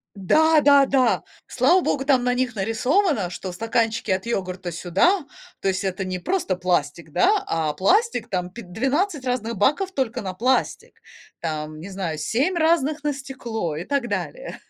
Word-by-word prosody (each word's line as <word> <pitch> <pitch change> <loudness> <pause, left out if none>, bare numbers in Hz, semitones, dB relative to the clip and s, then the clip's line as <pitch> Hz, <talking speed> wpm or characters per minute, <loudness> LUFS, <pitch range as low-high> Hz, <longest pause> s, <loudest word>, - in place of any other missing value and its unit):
Да-да-да, 280 - +4 0.3
слава 370 - +3
Богу, 270 - -1
там 265 -3 +3
на 250 - +2
них 250 -2 -1
нарисовано, 230 - +1
что 185 +1 -6
стаканчики 225 +2 -1
от 190 +3 0
йогурта- 185 -5 -3
сюда, 195 - +2 0.4
то - - 0
есть, 190 +1 -1
это 190 0 -2
не 185 0 -3
просто 195 - -1
пластик, 170 -3 -1
да, 405 - +3
а 160 -2 -1
пластик 365 - +2
там 180 -3 -2
пи 235 +6 -9
12 270 - -1
разных 235 -3 -2
баков 300 - +1
только 260 -8 -2
на 185 -2 -5
пластик, 255 +7 -1 0.4
там, 155 -1 -4
не 180 +5 -8
знаю, 185 -5 -4
7 265 - 0
разных- 315 -2 +1
на 295 - +1
стекло, 240 - -5
и 165 - -5
так 275 +1 -1
далее. - - -4
230 Hz, 160 wpm, -23 LUFS, 185-285 Hz, 0.4 s, Да-да-да